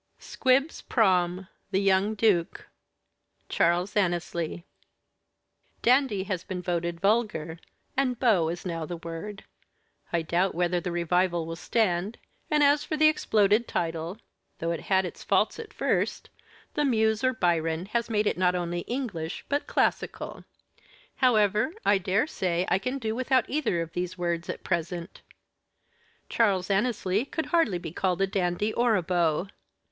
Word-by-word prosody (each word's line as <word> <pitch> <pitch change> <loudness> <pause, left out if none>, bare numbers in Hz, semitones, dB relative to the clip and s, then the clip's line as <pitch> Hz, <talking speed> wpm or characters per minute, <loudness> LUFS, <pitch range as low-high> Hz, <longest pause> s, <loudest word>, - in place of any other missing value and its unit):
SQUIBS 270 +4 +1
PROM 185 -4 +1 0.2
'THE 195 -1 +1
YOUNG 195 +2 +2
DUKE' 195 -6 +1 0.8
CHARLES 175 +3 +1
ANNESLEY 175 -3 -1 1.2
Dandy 245 -5 +3
has 185 -3 -3
been 185 -2 -5
voted 170 -1 -2
vulgar, 195 -6 0 0.4
and 260 -2 +1
beau 195 -10 +3
is 175 +2 -5
now 165 -2 -3
the 170 +2 -5
word. 170 +5 -7 0.7
I 170 -1 0
doubt 175 +3 0
whether 175 0 +1
the 180 0 -4
revival 175 0 +1
will 165 0 -5
stand; 195 +1 0 0.3
and 300 -1 +3
as 285 +1 +4
for 310 - -3
the 310 0 +6
exploded 215 -6 +2
title, 165 +2 -3 0.4
though 165 +1 -2
it 170 - -2
had 190 -1 +3
its 175 - -8
faults 205 - +1
at 450 -2 -8
first, - - -1 0.4
the 295 - 0
muse 220 -4 +2
or 255 - +4
Byron 165 -3 0
has 235 +3 -2
made 215 -1 +1
it 195 - 0
not 180 -1 +3
only 175 -1 -2
English, 205 -11 -4
but 285 +1 -1
classical. - - -1 0.7
However, 215 - +3
I 205 - +4
dare 195 +6 +1
say 180 - -1
I - - +3
can 255 +7 -3
do 220 -4 -2
without 255 0 +1
either 245 - 0
of 165 0 -11
these 180 +1 -3
words 170 -1 -2
at - - -5
present. 170 0 -3 1.1
Charles 200 -4 +1
Annesley 205 -1 +1
could 315 +3 -4
hardly 325 - +2
be 170 - -7
called 180 +1 -1
a 195 - +3
dandy 190 +2 -1
or 235 -2 +3
a 185 - 0
beau. 175 0 +1
190 Hz, 150 wpm, -27 LUFS, 175-225 Hz, 1.2 s, the